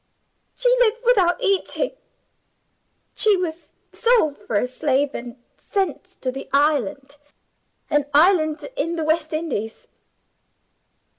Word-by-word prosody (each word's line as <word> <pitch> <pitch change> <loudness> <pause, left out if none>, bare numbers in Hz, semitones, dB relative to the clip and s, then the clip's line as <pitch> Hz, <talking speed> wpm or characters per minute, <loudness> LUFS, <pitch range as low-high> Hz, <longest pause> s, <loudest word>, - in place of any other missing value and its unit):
She - - 0
lived 475 0 +2
without 380 -8 +3
eating. 395 +5 0 1.2
She 420 -3 +4
was 340 -2 -5 0.2
sold 460 - +2
for 220 - -5
a 205 - +2
slave, 270 +2 0
and 240 0 -7 0.2
sent 390 - -2 0.2
to 255 - -1
the 270 +1 -8
island 280 -1 0 0.7
an 295 -1 +1
island 310 0 +3
in 340 -8 -2
the 325 - -2
West 315 0 0
Indies. 305 -9 -4
310 Hz, 115 wpm, -22 LUFS, 280-385 Hz, 1.2 s, She